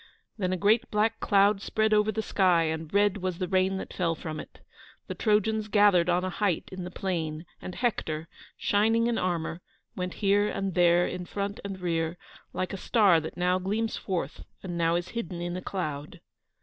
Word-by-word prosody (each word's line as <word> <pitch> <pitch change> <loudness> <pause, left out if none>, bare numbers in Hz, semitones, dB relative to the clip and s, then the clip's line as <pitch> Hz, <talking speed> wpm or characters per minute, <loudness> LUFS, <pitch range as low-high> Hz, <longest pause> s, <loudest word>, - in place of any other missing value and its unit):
Then 185 -4 -1
a 185 - 0
great 210 +5 +3
black 215 +1 +1
cloud 200 0 +3
spread 220 0 +1
over 210 0 +3
the 220 +1 -2
sky, 180 -5 +3
and 160 -1 -3
red 205 0 +3
was 185 -3 -3
the 185 0 -2
rain 190 0 +2
that - - -7
fell 170 -3 0
from 155 -1 -6
it. - - -10 0.5
The - - -5
Trojans 215 0 +1
gathered 205 -5 +4
on 180 +1 +2
a 185 - -2
height 195 -2 0
in 185 -1 -6
the - - -5
plain, 165 -4 -3 0.2
and 185 - -7
Hector, 165 -10 -1 0.3
shining 225 +3 +2
in 235 -1 +1
armour, 170 -1 -2 0.3
went 180 -1 -4
here 205 0 +2
and 195 -2 -2
there, 175 0 +4
in 180 -1 -4
front 200 0 -3
and 195 -1 -5
rear, 165 -1 -1 0.3
like 185 - -3
a - - -3
star 195 -4 +4
that 160 +2 -7
now 180 +1 +2
gleams 215 +4 -1
forth 175 -8 -4 0.2
and 180 -2 -4
now 165 0 +2
is 175 +1 -2
hidden 225 -7 -5
in 175 0 -3
a 185 - -4
cloud. 150 -7 -4
185 Hz, 195 wpm, -28 LUFS, 175-205 Hz, 0.5 s, gathered